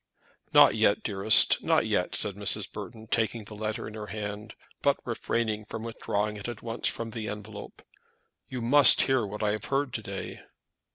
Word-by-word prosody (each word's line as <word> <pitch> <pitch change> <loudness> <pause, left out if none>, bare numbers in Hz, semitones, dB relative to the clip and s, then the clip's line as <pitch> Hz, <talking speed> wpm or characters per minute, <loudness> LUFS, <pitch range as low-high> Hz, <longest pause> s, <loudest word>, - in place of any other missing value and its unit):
"Not - - +7
yet, - - +2
dearest; 100 +2 +5
not - - +2
yet," - - -1
said 100 - +1
Mrs. 100 0 -1
Burton, 110 -1 -9
taking 110 0 -1
the 110 - -11
letter 110 0 -4
in 110 - -9
her 105 -1 -7
hand, 105 +1 -6 0.3
but - - +2
refraining 110 -2 -2
from 110 +1 -7
withdrawing 105 -2 -3
it 105 - -7
at 120 -3 -7
once 115 0 -2
from 115 -1 -3
the 110 -1 -5
envelope. 105 -1 -9 0.7
"You 125 -2 -5
must 140 +4 +7
hear 130 -3 +1
what 105 +2 -6
I 105 - +1
have 105 -1 -4
heard 135 -2 -1
to 110 - -3
day." 100 -2 -7
110 Hz, 180 wpm, -27 LUFS, 105-115 Hz, 0.7 s, Not